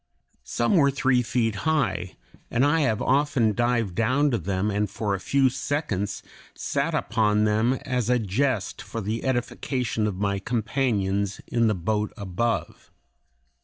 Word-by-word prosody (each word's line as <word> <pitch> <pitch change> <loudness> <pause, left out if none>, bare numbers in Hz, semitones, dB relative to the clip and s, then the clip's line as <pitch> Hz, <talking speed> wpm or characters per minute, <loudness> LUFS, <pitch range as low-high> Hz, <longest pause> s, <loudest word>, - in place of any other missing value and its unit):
Some 120 +10 +1
were 140 -3 +5
three 135 -2 +2
feet 115 -3 0
high, 100 - 0 0.3
and 125 +4 +2
I 155 +3 +3
have 115 -8 +1
often 135 -5 +2
dived 120 -4 0
down 130 +8 +2
to 120 - 0
them 95 +3 -1
and 105 0 0
for 100 +1 -2
a 95 - -1
few 135 +6 +2
seconds 130 -7 -2 0.3
sat 145 +3 -1
upon 105 -6 +2
them 110 +4 +2
as 125 -3 -1
a 125 - +4
jest 110 0 -1
for 105 +2 -6
the 110 +2 -3
edification 125 -3 -1
of 105 - -2
my 100 0 0
companions 105 -4 -1
in 115 -1 +1
the 105 - +2
boat 105 +4 -1
above. 110 +4 -2
115 Hz, 150 wpm, -25 LUFS, 105-130 Hz, 0.3 s, were